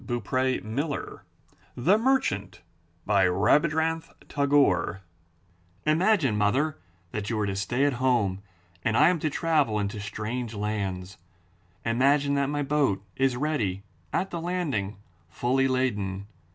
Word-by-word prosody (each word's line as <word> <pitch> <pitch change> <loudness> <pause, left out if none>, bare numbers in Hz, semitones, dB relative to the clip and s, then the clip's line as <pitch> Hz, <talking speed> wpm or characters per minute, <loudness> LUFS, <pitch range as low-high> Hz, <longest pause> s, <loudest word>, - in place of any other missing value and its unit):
323 130 +1 -1
M - - -5
Y 140 - +2
BOOK 145 -2 -2
HOUSE - - -9 0.5
THE 180 - +3
MERCHANT* 100 - 0 0.5
Rabindranath 150 - +2 0.2
Tagore 140 - +2 0.8
Imagine, 160 - +3
mother, 125 +7 +1 0.3
that 105 -1 -4
you 115 - -1
are 105 - +1
to 100 -1 -2
stay 120 +8 0
at 145 - +2
home 110 -7 +1 0.4
and 115 0 +1
I - - +6
am 180 -2 +1
to 155 - 0
travel 150 -8 +1
into 105 +1 -2
strange 110 +3 -4
lands. 100 -3 -3 0.7
Imagine 140 +5 +3
that 140 -1 +1
my 145 0 -1
boat 135 -9 +1
is 135 -2 +1
ready 115 -10 -1 0.3
at 190 - -1
the 170 - -4
landing, 150 - -2 0.3
fully 130 +8 +1
laden. 105 -7 -1
125 Hz, 135 wpm, -27 LUFS, 100-145 Hz, 0.8 s, I